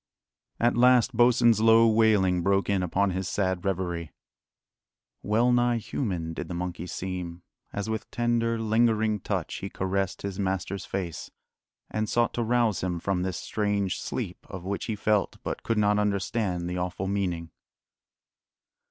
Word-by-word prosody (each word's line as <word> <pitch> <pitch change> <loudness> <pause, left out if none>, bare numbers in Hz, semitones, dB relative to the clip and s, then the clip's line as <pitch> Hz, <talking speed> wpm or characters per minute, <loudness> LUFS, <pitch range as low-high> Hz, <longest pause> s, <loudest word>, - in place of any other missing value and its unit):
At 120 +1 +3
last 125 0 +4
Bosin's 120 -2 +5
low 115 +1 +6
wailing 105 -5 +3
broke 100 +2 +1
in 100 -2 +1
upon 95 +2 +1
his 95 -1 -3
sad 95 -1 -1
reverie. 85 -4 -2 1.1
Well 115 +4 +2
nigh 120 -1 +3
human 95 -7 -3
did - - -5
the 90 - -5
monkey 90 0 -4
seem, 90 -1 -5 0.3
as 100 0 -4
with 110 -1 -3
tender, 120 -1 0
lingering 110 -1 +2
touch - - -3
he 100 - -5
caressed 95 0 -2
his 100 -1 -4
master's 95 -1 -2
face, 90 -4 -4 0.6
and 110 0 -1
sought 120 0 +1
to 120 - -1
rouse 115 -3 +1
him 90 -2 -2
from 95 0 -1
this 95 0 -2
strange 100 -3 -1
sleep - - -5
of 95 - -7
which 100 +2 -3
he 110 - -2
felt 105 -1 0
but - - -4
could 115 - -1
not 105 0 +3
understand 100 -3 -1
the 90 0 -3
awful 90 +1 -3
meaning. 90 -4 -2
100 Hz, 150 wpm, -27 LUFS, 90-110 Hz, 1.1 s, low